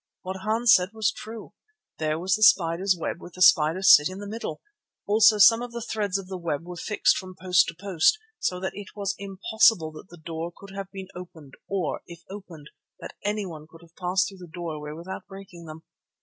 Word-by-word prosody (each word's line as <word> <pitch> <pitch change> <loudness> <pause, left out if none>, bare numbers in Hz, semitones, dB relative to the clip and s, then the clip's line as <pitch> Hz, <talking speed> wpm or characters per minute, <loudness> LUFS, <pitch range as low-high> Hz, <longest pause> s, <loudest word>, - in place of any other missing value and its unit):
What 190 +1 -5
Hans 220 +4 +3
said 185 +3 +2
was 220 -1 +1
true. 220 0 -10 0.5
There 155 0 0
was 185 +3 -1
the 215 - 0
spider's 185 -2 +4
web 165 +1 -4
with 175 - -12
the 185 - -10
spider 165 +1 +5
sitting 155 -1 +7
in 190 - -9
the 205 - -7
middle. 225 +3 -5 0.5
Also 215 +1 +5
some 230 +3 +7
of 245 -1 -7
the 235 -1 -5
threads 205 -3 -1
of 195 - -7
the 185 0 -7
web 165 -3 -3
were 180 0 -8
fixed 205 +4 +1
from 185 -1 -8
post 180 0 +3
to 165 - -6
post, 195 - +2 0.2
so 180 - -1
that 190 - -4
it 205 -1 -10
was 200 -2 -2
impossible 200 -2 +2
that 155 +4 -13
the 175 - -13
door 165 +1 -6
could 200 0 -13
have 195 -1 -6
been 190 -1 -8
opened 160 -6 -11 0.2
or, 190 -6 -2
if 170 0 -12
opened, 180 -7 -11 0.3
that - - -9
anyone 190 -7 -4
could 165 0 -16
have 165 0 -21
passed 185 +1 0
through 195 -2 -11
the 180 - -10
doorway 160 -4 -6
without 170 +6 -8
breaking 195 -3 -12
them. 160 0 -10
185 Hz, 210 wpm, -25 LUFS, 165-200 Hz, 0.5 s, sitting